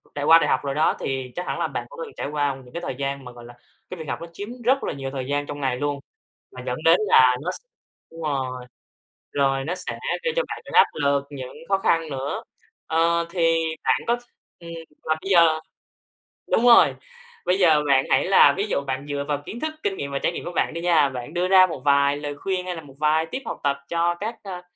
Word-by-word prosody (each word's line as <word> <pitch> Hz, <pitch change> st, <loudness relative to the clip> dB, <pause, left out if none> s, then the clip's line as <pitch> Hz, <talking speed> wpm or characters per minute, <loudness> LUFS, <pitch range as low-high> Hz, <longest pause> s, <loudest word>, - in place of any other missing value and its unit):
trải 145 Hz, 0 st, -2 dB
qua 165 Hz, +2 st, +8 dB
đại 150 Hz, -, +1 dB
học -, -, +3 dB
rồi 140 Hz, -1 st, -3 dB
đó, 155 Hz, +1 st, +2 dB
thì 130 Hz, -2 st, -3 dB
chắc 180 Hz, -, -4 dB
hẳn -, -, -3 dB
là -, -, 0 dB
bạn -, -, -5 dB
cũng -, -, -12 dB
từng 440 Hz, -, -13 dB
trải -, -, -3 dB
qua 145 Hz, -1 st, -1 dB
những 130 Hz, -2 st, -15 dB
cái 170 Hz, -, -4 dB
thời 155 Hz, -, -4 dB
gian 140 Hz, 0 st, -4 dB
mà, 125 Hz, -, -8 dB
gọi 120 Hz, -1 st, -13 dB
là, 120 Hz, -, -12 dB, 0.4 s
cái 185 Hz, -, -7 dB
việc 160 Hz, -3 st, -7 dB
học -, -, -3 dB
nó 170 Hz, -, -6 dB
chiếm 205 Hz, +5 st, -7 dB
rất 265 Hz, +4 st, +2 dB
là -, -, -2 dB
nhiều 135 Hz, -1 st, -5 dB
thời 135 Hz, -2 st, -4 dB
gian 145 Hz, +1 st, -1 dB
trong 145 Hz, 0 st, -7 dB
ngày 130 Hz, -2 st, 0 dB
luôn, 145 Hz, +1 st, -2 dB, 0.5 s
mà 125 Hz, -, -9 dB
dẫn 125 Hz, -1 st, -2 dB
đến 165 Hz, +2 st, +6 dB
là 125 Hz, -7 st, +6 dB
nó 175 Hz, +4 st, -2 dB
s -, -, -5 dB, 0.5 s
đúng 165 Hz, 0 st, -10 dB
rồi, 130 Hz, -4 st, -3 dB, 0.7 s
rồi 135 Hz, -1 st, +1 dB
nó 175 Hz, +4 st, -2 dB
sẽ -, -, -3 dB, 0.2 s
gây 485 Hz, -1 st, 0 dB
cho -, -, +3 dB
bạn -, -, -6 dB
những -, -, -10 dB
áp -, -, +7 dB
lực, 140 Hz, -1 st, +1 dB
những 130 Hz, -3 st, -8 dB
khó 195 Hz, -, +3 dB
khăn 165 Hz, -4 st, +1 dB
nữa. 135 Hz, 0 st, -4 dB, 0.4 s
Ờ, 170 Hz, +1 st, +2 dB
thì 165 Hz, -2 st, +2 dB, 0.3 s
bạn -, -, +2 dB
có 235 Hz, -, +3 dB
th -, -, -11 dB, 0.4 s
ừm, 170 Hz, -, -11 dB, 0.4 s
mà 155 Hz, -, +3 dB
bây 195 Hz, -, -6 dB
giờ 165 Hz, -3 st, +5 dB, 0.9 s
đúng 235 Hz, -, +3 dB
rồi, 240 Hz, -1 st, +7 dB, 0.5 s
bây 180 Hz, -, +2 dB
giờ 160 Hz, -5 st, +5 dB
bạn 135 Hz, -1 st, +4 dB
hãy 130 Hz, -, +3 dB
là 195 Hz, -, +6 dB
ví 195 Hz, -, 0 dB
dụ -, -, 0 dB
bạn 130 Hz, +1 st, -3 dB
dựa 145 Hz, -1 st, -2 dB
vào 145 Hz, -1 st, 0 dB
kiến 235 Hz, -, -7 dB
thức, 310 Hz, +3 st, -3 dB
kinh 195 Hz, -, 0 dB
nghiệm 140 Hz, 0 st, -4 dB
và 140 Hz, -, -2 dB
trải -, -, 0 dB
nghiệm -, -, -7 dB
của 175 Hz, -, -4 dB
bạn 170 Hz, -, 0 dB
đi 170 Hz, -, -5 dB
nha, 165 Hz, -5 st, +4 dB
bạn 125 Hz, -2 st, -7 dB
đưa 175 Hz, +1 st, 0 dB
ra 185 Hz, 0 st, +7 dB
một 165 Hz, -, -6 dB
vài 140 Hz, 0 st, +4 dB
lời 145 Hz, 0 st, -5 dB
khuyên 185 Hz, +2 st, -2 dB
hay 180 Hz, -1 st, -3 dB
là 165 Hz, -, -7 dB
một 140 Hz, -3 st, -15 dB
vài 155 Hz, +1 st, +2 dB
tip 260 Hz, +11 st, -5 dB
học -, -, -5 dB
tập 140 Hz, -1 st, +1 dB
cho 170 Hz, +1 st, +1 dB
các, 215 Hz, +6 st, -4 dB
ờ, 185 Hz, -3 st, -7 dB
150 Hz, 255 wpm, -23 LUFS, 140-175 Hz, 0.9 s, qua